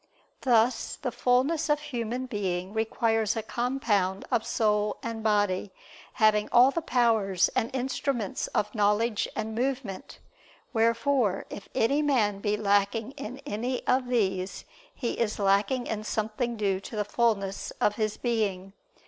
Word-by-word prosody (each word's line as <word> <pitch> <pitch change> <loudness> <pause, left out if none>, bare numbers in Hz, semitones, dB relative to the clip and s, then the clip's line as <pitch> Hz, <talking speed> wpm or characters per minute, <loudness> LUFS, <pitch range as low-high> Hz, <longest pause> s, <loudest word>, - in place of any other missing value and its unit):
Thus 240 -1 +2
the 250 - -4
fulness 260 +7 +1
of 295 0 +3
human 245 -3 -3
being 190 -5 -3
requires 225 0 +1
a 225 - -2
compound 215 -7 0
of 235 -3 +1
soul 210 -2 +1
and 230 -1 -4
body, 205 -3 +1 0.4
having 215 -1 +3
all 250 +3 +7
the 335 - -2
powers 225 - +2
and 245 -3 +1
instruments 260 -4 -2
of 210 0 -1
knowledge 210 +1 +1
and 220 0 -3
movement: 245 -4 -3 0.6
wherefore 230 -1 +2
if 200 - -8
any 280 +6 +2
man 225 -9 +2
be 205 +1 0
lacking 205 +3 +1
in 270 -2 -8
any 250 0 -3
of 255 0 +2
these, 195 -6 -1 0.3
he 240 - -4
is 225 -2 0
lacking 200 +5 +2
in 215 -1 -3
something 220 +3 -2
due 195 -3 0
to 200 - -9
the 210 -1 -1
fulness 205 -3 0
of 210 - +2
his 215 -2 -1
being. 200 -5 -1
225 Hz, 140 wpm, -28 LUFS, 205-245 Hz, 0.6 s, all